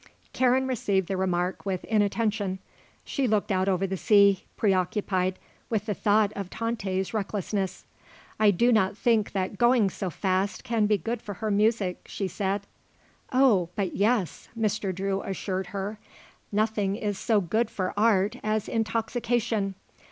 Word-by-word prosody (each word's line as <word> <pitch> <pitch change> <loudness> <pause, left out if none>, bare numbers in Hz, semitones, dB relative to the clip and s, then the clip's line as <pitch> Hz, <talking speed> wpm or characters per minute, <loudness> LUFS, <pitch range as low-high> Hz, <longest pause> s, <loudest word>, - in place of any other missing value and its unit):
Karen 260 +1 +3
received 200 -8 0
the 195 - -1
remark 180 -1 -1
with 190 -3 -2
inattention. 210 -2 0 0.5
She 275 -3 -1
looked 215 -2 +1
out 190 0 +2
over 190 0 +1
the 190 0 -2
sea, 200 -1 +4
preoccupied 185 -1 +1 0.3
with 215 -3 -1
the 215 - -1
thought 210 +1 +2
of 195 -2 -5
Tante's 200 -5 -2
recklessness. 200 -2 -2 0.5
"I 215 -1 +6
do 235 +6 +3
not 205 -3 +2
think 225 -3 +2
that 190 0 -2
going 240 -5 +4
so 190 0 -4
fast 190 +3 -1
can 230 -4 +1
be 210 0 +3
good 225 +6 -3
for 205 -3 -7
her 215 +2 -2
music," 205 -3 +1
she 195 - -3
said. 195 +2 -2 0.7
"Oh, 245 -10 +4
but 195 -3 -2
yes," 210 -3 0
Mr. 215 -3 0
Drew 195 +1 -2
assured 190 -1 -3
her, 200 +3 -5 0.5
"nothing 210 -2 +1
is 205 -2 -3
so 220 -3 +2
good 215 +5 0
for 185 -4 -3
art 210 +1 +2
as 215 -1 0
intoxication. 225 -1 -1
205 Hz, 150 wpm, -27 LUFS, 190-220 Hz, 0.7 s, I